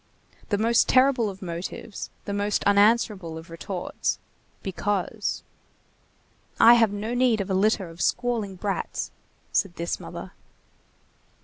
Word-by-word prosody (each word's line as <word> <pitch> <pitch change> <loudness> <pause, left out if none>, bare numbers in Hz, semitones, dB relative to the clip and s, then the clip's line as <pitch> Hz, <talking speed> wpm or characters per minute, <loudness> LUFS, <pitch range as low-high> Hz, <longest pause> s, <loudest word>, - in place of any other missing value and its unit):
The 205 - +2
most 230 +2 +3
terrible 255 -4 +4
of 190 0 -9
motives, 175 +4 -6 0.2
the 200 - -3
most 205 0 0
unanswerable 200 -4 +3
of 165 +1 -11
retorts—Because. 190 +4 -3 1.2
"I 235 - +9
have 230 -3 +4
no 210 +3 -3
need 245 -3 +3
of 195 -1 -2
a - - +2
litter 195 0 +2
of 165 +1 -9
squalling 230 -6 0
brats," 195 +1 -3 0.4
said 195 -4 +1
this 170 +1 -3
mother. - - -8
205 Hz, 120 wpm, -25 LUFS, 185-225 Hz, 1.2 s, I